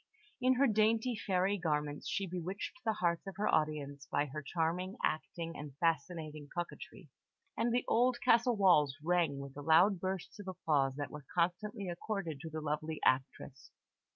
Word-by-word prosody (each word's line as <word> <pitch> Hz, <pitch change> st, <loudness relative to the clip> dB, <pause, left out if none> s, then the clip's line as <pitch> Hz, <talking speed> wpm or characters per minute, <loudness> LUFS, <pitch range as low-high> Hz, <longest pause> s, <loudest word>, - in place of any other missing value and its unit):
In 255 Hz, +1 st, +4 dB
her 275 Hz, +3 st, +4 dB
dainty 225 Hz, +1 st, +2 dB
fairy 195 Hz, 0 st, 0 dB
garments 150 Hz, -3 st, -1 dB
she 195 Hz, -, -1 dB
bewitched 185 Hz, -, -5 dB
the 220 Hz, -2 st, +1 dB
hearts 175 Hz, -2 st, 0 dB
of 195 Hz, -, -6 dB
her 210 Hz, -, 0 dB
audience 145 Hz, -2 st, 0 dB
by 145 Hz, -, +1 dB
her 150 Hz, +2 st, -6 dB
charming 175 Hz, -, -2 dB
acting 165 Hz, +2 st, -2 dB
and 145 Hz, -2 st, -8 dB
fascinating 155 Hz, -2 st, -1 dB
coquetry, 175 Hz, 0 st, -6 dB, 0.5 s
and 235 Hz, +1 st, +1 dB
the 245 Hz, +1 st, +1 dB
old 245 Hz, +1 st, +3 dB
castle 235 Hz, +1 st, +4 dB
walls 155 Hz, -8 st, +5 dB
rang 170 Hz, -4 st, +2 dB
with 140 Hz, -1 st, -7 dB
the 145 Hz, -, -8 dB
loud 170 Hz, +6 st, +5 dB
bursts 190 Hz, +2 st, -4 dB
of 200 Hz, -, -8 dB
applause 145 Hz, -7 st, +1 dB
that 145 Hz, 0 st, -4 dB
were 150 Hz, -3 st, -9 dB
constantly 195 Hz, +4 st, 0 dB
accorded 175 Hz, -3 st, -3 dB
to 160 Hz, -, -7 dB
the 155 Hz, 0 st, -5 dB
lovely 155 Hz, +1 st, -2 dB
actress. 130 Hz, +1 st, 0 dB
170 Hz, 165 wpm, -34 LUFS, 150-200 Hz, 0.5 s, walls